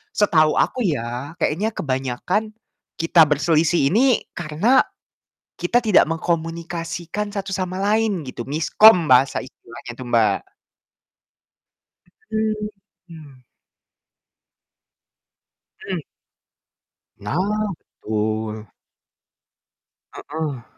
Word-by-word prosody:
setahu 155 Hz, -7 st, +3 dB
aku -, -, 0 dB
ya, 130 Hz, +2 st, -4 dB
kayaknya 205 Hz, +8 st, 0 dB
kebanyakan 140 Hz, -, -2 dB, 0.4 s
kita 165 Hz, 0 st, +5 dB
berselisih 155 Hz, 0 st, +2 dB
ini 250 Hz, +3 st, +3 dB
karena 175 Hz, +11 st, +2 dB, 0.8 s
kita 175 Hz, +8 st, +2 dB
tidak 215 Hz, -5 st, +5 dB
mengkomunikasikan 170 Hz, +4 st, -3 dB
satu 195 Hz, -1 st, -4 dB
sama 185 Hz, 0 st, -3 dB
lain 210 Hz, -3 st, +1 dB
gitu, 125 Hz, -2 st, -6 dB
"miskom" 165 Hz, +5 st, +5 dB
bahasa 130 Hz, +2 st, +4 dB
istilahnya 120 Hz, 0 st, -11 dB
tuh, 130 Hz, -, -7 dB
Mbak, 115 Hz, -2 st, +3 dB, 1.9 s
Mhm. 200 Hz, -9 st, -6 dB, 2.5 s
Mmm. -, -, -1 dB, 1.2 s
Nah, 105 Hz, +9 st, -3 dB, 0.6 s
betul. 110 Hz, 0 st, -3 dB, 1.5 s
Heeh. 150 Hz, -5 st, -5 dB
165 Hz, 75 wpm, -21 LUFS, 135-200 Hz, 2.5 s, kita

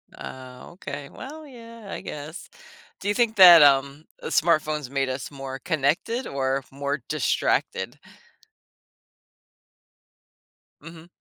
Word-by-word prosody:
Ah, 130 Hz, -1 st, -10 dB
okay. 145 Hz, -5 st, -8 dB
Well, 305 Hz, +4 st, -10 dB
yeah, 230 Hz, -5 st, -13 dB
I -, -, -6 dB
guess. 150 Hz, +4 st, -8 dB, 0.5 s
Do 195 Hz, -, -6 dB
you 205 Hz, -, +2 dB
think 225 Hz, 0 st, +1 dB
that, 175 Hz, -5 st, +10 dB
um, 140 Hz, +1 st, +3 dB, 0.2 s
uh, -, -, -4 dB
smartphones 155 Hz, -4 st, +1 dB
made 135 Hz, 0 st, -1 dB
us 130 Hz, +1 st, -5 dB
more 135 Hz, -1 st, -7 dB
connected 165 Hz, -, -1 dB
or 135 Hz, 0 st, -2 dB
more 140 Hz, +1 st, -3 dB
distracted? 150 Hz, -4 st, -1 dB, 2.8 s
Mhm. 165 Hz, +1 st, -12 dB
150 Hz, 110 wpm, -24 LUFS, 135-190 Hz, 2.8 s, that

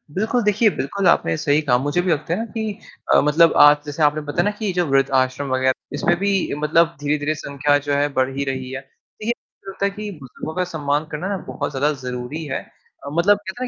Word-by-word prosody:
बिल्कुल 220 Hz, +5 st, +1 dB
देखिए, 210 Hz, +2 st, +3 dB
बिल्कुल 190 Hz, +8 st, -1 dB
आपने 80 Hz, -, +3 dB
सही 145 Hz, +2 st, +2 dB
कहा 130 Hz, -5 st, +2 dB
मुझे 145 Hz, +7 st, 0 dB
भी 180 Hz, 0 st, 0 dB
लगता 155 Hz, +1 st, -1 dB
है 180 Hz, -, -1 dB
ना, 225 Hz, -, -2 dB
कि 220 Hz, -2 st, -5 dB, 0.3 s
अ, -, -, +7 dB
मतलब 155 Hz, +3 st, +4 dB
आज 145 Hz, 0 st, +8 dB
जैसे 145 Hz, +1 st, -2 dB
आपने 150 Hz, +1 st, +3 dB
बताया 145 Hz, -, +1 dB
ना 205 Hz, -, +1 dB
कि 215 Hz, -3 st, -1 dB
जो 175 Hz, 0 st, +1 dB
वृद्धाश्रम 135 Hz, -1 st, +1 dB
वगैरह 130 Hz, 0 st, +2 dB, 0.2 s
इसमें 160 Hz, +4 st, +1 dB
भी 200 Hz, +1 st, +1 dB, 0.3 s
मतलब 165 Hz, +3 st, +2 dB
धीरे-धीरे 145 Hz, +1 st, 0 dB
संख्या 145 Hz, -1 st, +1 dB
जो 145 Hz, -, +1 dB
है 145 Hz, +1 st, +2 dB
बढ़ 130 Hz, 0 st, +1 dB
ही 140 Hz, -, 0 dB
रही 130 Hz, -1 st, -4 dB
है। 130 Hz, -, -4 dB
देखिए 215 Hz, -, -6 dB
मुझे 195 Hz, -, -16 dB
लगता 200 Hz, +1 st, -2 dB
है -, -, +2 dB
कि 210 Hz, +1 st, -6 dB
बुज़ुर्गों 135 Hz, +4 st, -8 dB
का 185 Hz, -, +1 dB
सम्मान 145 Hz, -1 st, -1 dB
करना 155 Hz, +5 st, -4 dB
ना, 200 Hz, -, -1 dB
बहुत -, -, -4 dB
ज़्यादा 145 Hz, +2 st, +1 dB
ज़रूरी 125 Hz, +5 st, -5 dB
है 135 Hz, -3 st, -3 dB, 0.5 s
अ, 140 Hz, -, -4 dB
मतलब 185 Hz, +5 st, +4 dB
कहते 205 Hz, +4 st, -7 dB
हैं -, -, -2 dB
150 Hz, 230 wpm, -21 LUFS, 140-190 Hz, 0.5 s, आज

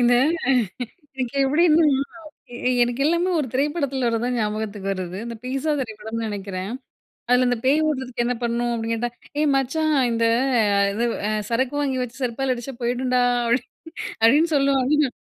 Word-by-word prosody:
இந்த 245 Hz, 0 st, +5 dB, 1.0 s
இதுக்கு 260 Hz, 0 st, -3 dB
எப்டின்னா, 310 Hz, +3 st, +4 dB, 0.7 s
எ -, -, -6 dB, 0.3 s
எனக்கு 245 Hz, +3 st, 0 dB
எல்லாமே 340 Hz, +3 st, +2 dB
1 290 Hz, -, 0 dB
திரைப்படத்துல 275 Hz, -2 st, 0 dB
வரதுதான் 235 Hz, +2 st, 0 dB
ஞாபகத்துக்கு 210 Hz, -2 st, -3 dB
வருது. 185 Hz, -1 st, -5 dB
இந்த 235 Hz, 0 st, -5 dB
"பீஸ்ஸா" 270 Hz, +4 st, -1 dB
திரைப்படம்னு 225 Hz, -1 st, -5 dB
நெனைக்கிறன். 195 Hz, -1 st, -4 dB, 0.6 s
அதுல 250 Hz, 0 st, +4 dB
"இந்த 245 Hz, -, +1 dB
பேய் 295 Hz, +4 st, +3 dB
ஓட்றதுக்கு 260 Hz, -4 st, -2 dB
என்ன 250 Hz, +1 st, 0 dB
பண்ணணும்?" 240 Hz, 0 st, 0 dB
அப்படின்னு 230 Hz, 0 st, -2 dB
கேட்டா 240 Hz, +1 st, -2 dB, 0.3 s
"ஏய் 305 Hz, -, +3 dB
மச்சான் 310 Hz, +4 st, 0 dB, 0.2 s
இந்த 230 Hz, 0 st, +1 dB, 0.5 s
அ -, -, +4 dB
இது 235 Hz, +3 st, 0 dB, 0.2 s
அ -, -, 0 dB, 0.2 s
சரக்கு 255 Hz, +4 st, 0 dB
வாங்கி 265 Hz, -3 st, 0 dB
வச்சு 250 Hz, +2 st, -7 dB
செருப்பால 255 Hz, +2 st, 0 dB
அடிச்சா 245 Hz, +2 st, -7 dB
போயிடும்டா" 250 Hz, +1 st, +1 dB, 0.2 s
அப்படி 235 Hz, +2 st, +2 dB, 0.6 s
அப்படின்னு 295 Hz, +9 st, +5 dB
சொல்லுவானுங்க. 275 Hz, +1 st, +3 dB
250 Hz, 150 wpm, -23 LUFS, 230-275 Hz, 1.0 s, இந்த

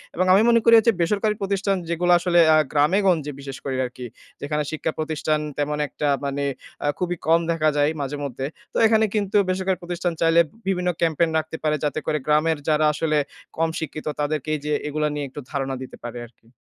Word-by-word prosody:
এবং 185 Hz, -, +1 dB
আমি 195 Hz, -, +6 dB
মনে 230 Hz, 0 st, +5 dB
করি 230 Hz, +1 st, +5 dB
এইযে 230 Hz, -, +4 dB
বেসরকারি 210 Hz, +4 st, +1 dB
প্রতিষ্ঠান 195 Hz, 0 st, 0 dB
যেগুলো 175 Hz, +1 st, +1 dB
আসলে 175 Hz, 0 st, +2 dB, 0.2 s
আ -, -, +6 dB
গ্রামে-গঞ্জে 160 Hz, 0 st, +2 dB
বিশেষ 135 Hz, -1 st, -7 dB
করে 135 Hz, -2 st, -3 dB
আরকি। 125 Hz, 0 st, -5 dB, 0.4 s
যেখানে 150 Hz, +1 st, -1 dB
শিক্ষা 155 Hz, 0 st, -2 dB
প্রতিষ্ঠান 155 Hz, -1 st, -1 dB, 0.2 s
তেমন 150 Hz, 0 st, -1 dB
একটা 150 Hz, -, -3 dB, 0.2 s
মানে 140 Hz, 0 st, -2 dB, 0.4 s
আ -, -, +1 dB
খুবই 180 Hz, -1 st, -1 dB
কম 165 Hz, +1 st, +5 dB
দেখা 155 Hz, -2 st, +2 dB
যায় 145 Hz, +1 st, +3 dB
মাঝে-মধ্যে। 140 Hz, -2 st, -4 dB, 0.4 s
তো -, -, -2 dB
এখানে 220 Hz, 0 st, +4 dB
কিন্তু 205 Hz, -1 st, +1 dB
বেসরকারি 185 Hz, 0 st, 0 dB
প্রতিষ্ঠান 175 Hz, 0 st, -2 dB
চাইলে 165 Hz, +1 st, +5 dB
উম -, -, -18 dB, 0.2 s
বিভিন্ন 180 Hz, -2 st, 0 dB
ক্যাম্পেইন 165 Hz, 0 st, +2 dB
রাখতে 160 Hz, +1 st, -3 dB
পারে, 155 Hz, -1 st, +2 dB
যাতে 150 Hz, +1 st, 0 dB
করে 150 Hz, -, 0 dB
গ্রামের 155 Hz, +1 st, +2 dB
যারা 155 Hz, 0 st, +3 dB
আসলে 155 Hz, 0 st, 0 dB, 0.4 s
কম 165 Hz, 0 st, +1 dB
শিক্ষিত 155 Hz, -1 st, -6 dB
তাদেরকে 150 Hz, 0 st, -2 dB
এইযে 150 Hz, 0 st, -3 dB
এগুলা 150 Hz, +1 st, -1 dB
নিয়ে 145 Hz, -1 st, -3 dB
একটু 135 Hz, -, -9 dB
ধারণা 135 Hz, -2 st, -2 dB
দিতে 130 Hz, -, -9 dB
পারে 120 Hz, 0 st, -6 dB
আরকি। 115 Hz, -1 st, -23 dB
155 Hz, 190 wpm, -23 LUFS, 145-180 Hz, 0.4 s, আমি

